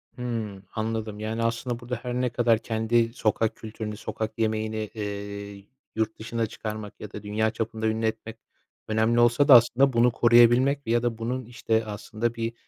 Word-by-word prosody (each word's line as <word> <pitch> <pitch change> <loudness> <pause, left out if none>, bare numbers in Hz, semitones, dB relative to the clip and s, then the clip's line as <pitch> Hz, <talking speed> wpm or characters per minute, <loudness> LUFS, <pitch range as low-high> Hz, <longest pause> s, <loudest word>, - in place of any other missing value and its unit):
Hıı, 115 -6 -4
anladım. 110 -1 -3
Yani, 110 +1 -2
aslında 115 +1 -2
burada 125 0 -4
her 125 -1 -3
ne 125 0 0
kadar 115 -1 +2
kendi 115 +1 0
sokak 110 -1 0
kültürünü, 110 -1 -6
sokak 110 0 -5
yemeğini, 110 -1 -1
eee, 100 -1 -6 0.3
yurt 110 0 -1
dışına 115 0 -2
çıkarmak 105 -1 -7
ya 105 - -8
da 105 - -8
dünya 110 +2 0
çapında 110 0 -3
ünlü 110 +1 0
etmek 110 0 -3 0.5
önemli 110 +2 +2
olsa 120 +5 +4
da 140 - +9
aslında 120 +3 +5
bunu 120 +1 +4
koruyabilmek 120 +3 +4
ya 120 +1 +2
da 120 -2 -1
bunun, 125 +2 -3
işte, 110 -1 -1
aslında 110 +2 -3
bir 115 0 -3
115 Hz, 165 wpm, -26 LUFS, 110-120 Hz, 0.5 s, da